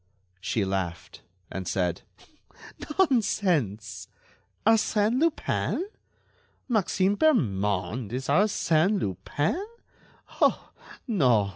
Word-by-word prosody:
She 100 Hz, +3 st, -1 dB
laughed, 95 Hz, -3 st, -4 dB, 0.3 s
and 95 Hz, -1 st, -5 dB
said: 90 Hz, -3 st, -1 dB, 1.0 s
"Nonsense! 185 Hz, -, +1 dB, 0.6 s
Arsène 225 Hz, +1 st, +3 dB
Lupin? 330 Hz, +3 st, 0 dB, 0.8 s
Maxime 200 Hz, -4 st, +1 dB
Bermond 105 Hz, -, +1 dB
is 130 Hz, +2 st, -3 dB
Arsène 190 Hz, +2 st, +2 dB
Lupin? 145 Hz, -, -2 dB, 0.8 s
Oh! -, -, +2 dB, 0.4 s
no! 125 Hz, -, +3 dB
145 Hz, 75 wpm, -27 LUFS, -, 1.0 s, Arsène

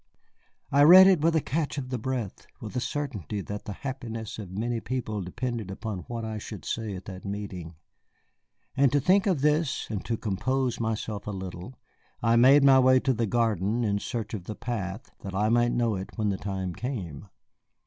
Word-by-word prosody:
I 140 Hz, -, +4 dB
read 180 Hz, +6 st, +10 dB
it 190 Hz, -5 st, +5 dB
with 165 Hz, +1 st, +3 dB
a 160 Hz, -, +3 dB
catch 150 Hz, +1 st, -2 dB
of 130 Hz, -2 st, -4 dB
the 125 Hz, -1 st, -2 dB
breath, 120 Hz, -4 st, -4 dB
with -, -, -8 dB
a -, -, +1 dB
certainty 120 Hz, -, -3 dB
that 105 Hz, +1 st, -6 dB
the 105 Hz, -, -4 dB
happiness 115 Hz, -5 st, -5 dB
of 100 Hz, -4 st, -7 dB
many 115 Hz, +5 st, -2 dB
people 110 Hz, -4 st, -3 dB
depended 115 Hz, +2 st, -4 dB
upon 100 Hz, -2 st, -5 dB
what 115 Hz, -1 st, -4 dB
I 110 Hz, -1 st, -4 dB
should 105 Hz, -1 st, -8 dB
say 110 Hz, -4 st, -3 dB
at 90 Hz, -, -9 dB
that 95 Hz, -1 st, -8 dB
meeting. 100 Hz, -5 st, -6 dB, 1.0 s
And 135 Hz, -2 st, +4 dB
to 145 Hz, -, +4 dB
think 190 Hz, +8 st, +3 dB
of 175 Hz, -8 st, +1 dB
this 150 Hz, 0 st, +1 dB
and 100 Hz, -3 st, -3 dB
to 115 Hz, -, -1 dB
compose 120 Hz, +5 st, -1 dB
myself 110 Hz, -2 st, -3 dB
a -, -, -1 dB
little, 95 Hz, +4 st, -7 dB, 0.4 s
I 115 Hz, 0 st, +3 dB
made 135 Hz, +4 st, +7 dB
my 135 Hz, -1 st, +7 dB
way 130 Hz, 0 st, +6 dB
to 130 Hz, -, +1 dB
the 115 Hz, -1 st, -1 dB
garden 110 Hz, 0 st, +1 dB
in 100 Hz, -2 st, +1 dB
search 115 Hz, -1 st, -4 dB
of 95 Hz, -5 st, -5 dB
the 105 Hz, -, -5 dB
path, 110 Hz, 0 st, -5 dB
that 95 Hz, -1 st, -6 dB
I 105 Hz, +2 st, +2 dB
might 120 Hz, +1 st, +3 dB
know 120 Hz, -2 st, +1 dB
it 95 Hz, 0 st, -5 dB
when 105 Hz, -2 st, +1 dB
the 95 Hz, -, -1 dB
time 95 Hz, -3 st, -4 dB
came. 100 Hz, -, -5 dB
115 Hz, 200 wpm, -27 LUFS, 100-130 Hz, 1.0 s, read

